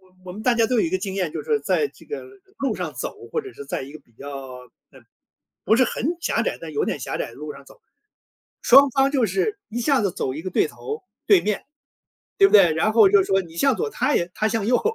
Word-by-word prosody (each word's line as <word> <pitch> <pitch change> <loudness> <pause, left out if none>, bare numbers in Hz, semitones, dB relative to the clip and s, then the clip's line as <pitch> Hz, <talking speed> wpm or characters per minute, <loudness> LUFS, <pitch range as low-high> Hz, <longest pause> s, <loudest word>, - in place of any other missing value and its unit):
我 185 -1 -27
我 180 - -8
们 215 +3 -8
大 250 - +3
家 230 -1 +3
都 250 - 0
有 - - +4
一 - - +1
个 185 - 0
经 190 0 -5
验。 180 -5 -1
就 - - -5
是 445 -2 0
在 440 - +1
这 - - -19
个， 440 - -6 0.4
路 275 - -1
上 - - -5
走， - - -7
或 460 - -2
者 400 - -10
是 430 +2 -10
在 - - -3
一 140 +2 -10
个 155 - -10
比 120 - -32
较， 140 +4 -9 0.6
呃， - - -17 0.6
不 220 - +4
是 260 - +4
很 285 +6 -1
狭 230 - 0
窄， - - -2
但 165 -2 -8
有 145 - 0
点 - - -3
狭 - - -4
窄 - - -2
的 - - -15
路 150 +2 -7
上 140 0 -14
走。 - - -18 0.8
双 275 +3 +7
方 270 +2 +2
就 260 -5 +2
是， 205 - -1
一 240 - -3
下 275 +1 +2
子 195 - 0
走 130 - -2
一 155 - -5
个 185 - -5
对 - - +2
头， 440 -1 -7 0.2
对 395 -3 +6
面， 210 -1 -2 0.7
对 395 - +8
不 - - -3
对？ 180 -5 +7
然 210 +7 +1
后 220 -3 +7
就 200 -2 +5
说 195 0 +1
你 165 -1 -14
向 275 +8 +3
左， 445 0 -2
他 295 - 0
也 170 +1 0
他 215 - 0
向 225 -2 -1
右， 245 +1 +3
215 Hz, 285 characters per minute, -23 LUFS, 175-275 Hz, 0.8 s, 对